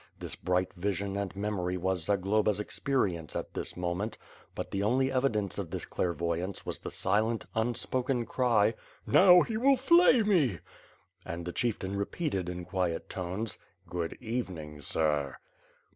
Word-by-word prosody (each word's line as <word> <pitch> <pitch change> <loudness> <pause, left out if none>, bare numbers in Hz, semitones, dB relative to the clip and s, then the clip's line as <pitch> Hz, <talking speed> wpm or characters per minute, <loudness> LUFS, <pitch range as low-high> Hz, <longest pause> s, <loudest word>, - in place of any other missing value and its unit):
This - - -4
bright 90 +1 0
vision 100 +1 -2
and 100 -1 -3
memory 100 -3 -1
was 90 -2 -1
Zagloba's 100 +2 +2
experience 105 - -1
at - - -4
this - - -4
moment; 90 +5 -2 0.4
but - - -5
the 100 - -1
only 130 +6 +2
evidence 110 -7 0
of - - -4
this - - -4
clairvoyance 85 +2 -2
was - - -4
the - - -6
silent, 110 +4 +1
un 115 +2 0
spoken 125 -1 -1
cry: 115 -4 +3 0.3
"Now 180 -2 +7
he 220 - -3
will 270 +4 +5
flay 270 -3 +6
me!" 160 - +3 0.7
And 85 0 -5
the 90 - -3
Chieftain 100 -5 -1
repeated 100 - -2
in 90 0 -5
quiet 90 -2 -2
tones: 95 +5 -4 0.3
"Good 85 -1 -3
evening, 90 -11 -4
sir." 75 -2 0
100 Hz, 145 wpm, -30 LUFS, 90-120 Hz, 0.7 s, Now